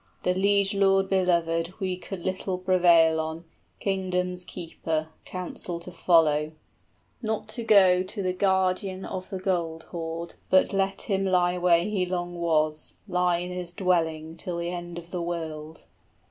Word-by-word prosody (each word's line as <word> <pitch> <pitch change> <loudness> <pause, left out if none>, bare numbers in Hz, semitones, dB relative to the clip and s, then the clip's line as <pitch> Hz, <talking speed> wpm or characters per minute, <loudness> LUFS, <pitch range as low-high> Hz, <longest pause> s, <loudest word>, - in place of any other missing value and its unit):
The 180 - +2
liegelord 195 0 +3
belovèd 170 -2 +1
we 185 -2 -1
could 185 0 -7
little 185 0 -2
prevail 175 -3 +4
on, 160 +1 -4 0.3
Kingdom's 180 -2 -1
keeper, 160 -3 -4 0.2
counsel 180 -1 -5
to 175 +2 -9
follow, 155 -3 +3 0.7
Not 220 -1 -2
to 235 +2 -4
go 190 -5 +6
to 190 +2 -5
the 185 0 0
guardian 190 0 0
of 185 0 -6
the 190 - -4
gold 170 -4 -2
hoard, 165 0 -5 0.2
but 185 +2 +4
let 195 0 0
him 195 -2 0
25 190 - 0
Lie 180 -1 +3
where 170 -1 +4
he 190 -2 -1
long 175 -1 -3
was, 155 -2 0
live 180 -2 +1
in 180 - -6
his 180 -1 -5
dwelling 165 -4 0
Till 175 +1 -4
the 170 0 -2
end 175 -1 -6
of 170 0 -9
the 180 - -2
world. 160 -2 -5
180 Hz, 155 wpm, -26 LUFS, 170-190 Hz, 0.7 s, go